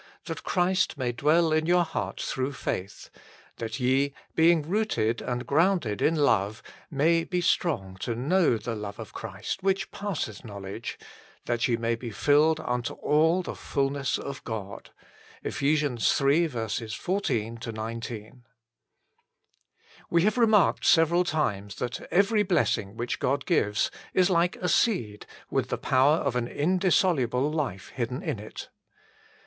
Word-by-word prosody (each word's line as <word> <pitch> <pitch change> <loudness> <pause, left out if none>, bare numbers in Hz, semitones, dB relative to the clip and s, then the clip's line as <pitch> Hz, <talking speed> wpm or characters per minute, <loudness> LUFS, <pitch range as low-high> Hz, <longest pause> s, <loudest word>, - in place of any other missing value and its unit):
That - - -5
Christ 185 -3 +1
may 125 -3 -1
dwell 155 +6 +2
in 155 0 +1
your 175 0 +4
hearts 160 - -4
through 130 +1 -2
faith; 100 -5 -5
3. - - -23 0.4
That 115 +3 -4
ye, 135 +2 +1 0.2
being 165 -1 +4
rooted 175 - 0
and 125 0 -3
grounded 155 - +1
in 165 - +3
love, 110 -8 +1 0.3
may 165 +4 +2
be 180 +1 -2
strong 145 - 0
to 115 +5 -3
know 150 +1 +2
the 115 +1 -4
love 105 -2 -6
of 110 - -9
Christ 105 - -5
which 195 0 0
passeth 160 - -4
knowledge; 100 0 -7
4. - - -16 0.4
That 120 -1 0
ye 120 -2 +1
may 115 0 0
be 115 +1 -5
filled 150 +7 +3
unto 125 -1 -2
all 160 +5 +2
the - - -5
fulness 140 -1 -1
of 140 -1 -7
God. 105 -4 -6 0.6
EPH. 140 -3 +1
iii. 115 - -6
14 115 - -2
19. 115 +1 -6 1.7
TT7E 170 - +4
have 215 +4 +2
remarked 215 -5 +4
several 170 +2 +4
times 105 - -2
that 125 -1 -4
every 205 +3 +3
blessing 170 - 0
which 120 +1 -3
God 140 +2 0
gives 105 - +1 0.2
is 185 +1 +4
like 175 0 +2
a 180 - -3
seed 120 - +1 0.2
with - - 0
the - - -1
power 135 +4 +3
of 140 -6 -1
an 120 -1 0
indissoluble 150 - +1
life 140 - -3
hidden 125 - -4
in 155 - -2
it. 105 - -9
140 Hz, 145 wpm, -27 LUFS, 115-170 Hz, 1.7 s, your